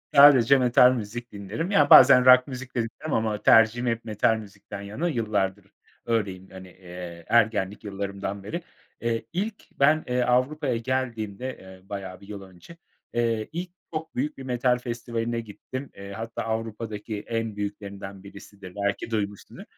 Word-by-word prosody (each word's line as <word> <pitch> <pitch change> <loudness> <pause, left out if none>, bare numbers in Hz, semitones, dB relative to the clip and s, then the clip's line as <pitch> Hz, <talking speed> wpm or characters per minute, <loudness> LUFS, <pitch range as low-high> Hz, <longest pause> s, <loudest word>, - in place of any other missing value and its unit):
Sadece 140 -2 +8
metal 125 0 +6
müzik 120 +1 -6
dinlerim. 105 - -4
Ya, 145 -8 +4
bazen 130 -1 +9
rock 125 0 +7
müzik 130 -1 -8
de - - +1
dinlerim 135 +6 -6
ama 110 -2 0
tercihim 115 +2 +5
hep 115 -1 -1
metal 110 0 +2
müzikten 100 -1 -9
yana 105 +12 -3
yıllardır 105 - -1 0.4
öyleyim, 100 -5 -2
hani, 95 0 -10
eee, 90 -2 -10
ergenlik 110 -4 +2
yıllarımdan 100 -1 -5
beri. 170 - -4 0.4
Eee, 115 -1 -1
ilk 205 +5 -2 0.2
ben, 155 +3 +4
eee, 125 0 0
Avrupa'ya 130 +1 +1
geldiğimde, 120 -1 -3
eee, 95 0 -15
bayağı 95 -2 -6
bir 100 - -14
yıl 100 -1 -7
önce, 95 - -14 0.4
eee, 115 -2 0
ilk 175 +3 -4 0.2
çok 160 0 -5
büyük 145 +4 -2
bir 135 - -8
metal 125 -1 +1
festivaline 120 -1 -3
gittim. 130 +5 -8
Eee, 100 0 -9
hatta 115 +3 -5
Avrupa'daki 110 -1 -4
en 115 -2 -2
büyüklerinden 100 -1 -6
birisidir 100 -1 -12
belki 100 +2 -2
duymuşsundur. 105 -2 -4
115 Hz, 150 wpm, -26 LUFS, 100-125 Hz, 0.4 s, bazen